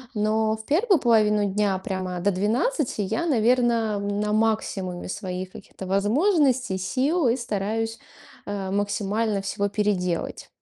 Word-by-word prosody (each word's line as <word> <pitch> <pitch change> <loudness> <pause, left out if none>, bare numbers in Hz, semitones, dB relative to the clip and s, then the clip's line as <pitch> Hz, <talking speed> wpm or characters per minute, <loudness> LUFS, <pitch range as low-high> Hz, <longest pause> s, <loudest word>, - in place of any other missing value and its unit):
Но 215 +1 +1
в 220 - -11
первую 375 - +3
половину 215 -4 +3
дня, 200 -1 +1
прямо 185 -1 -4
до 200 +3 +2
12 230 - 0
я, 335 - -1
наверно, 235 -4 +2
на 205 +1 -1
максимуме 210 -5 -1
своих 185 -1 -5
каких-то 190 - -10
возможностей, 250 - +2
сил 265 - +1
и 235 +2 +2
стараюсь, 225 -1 -2 0.5
а, 200 -2 -3
максимально 205 +1 -1
всего 200 +1 -1
переделать. 195 -4 -1
210 Hz, 125 wpm, -24 LUFS, 195-235 Hz, 0.5 s, первую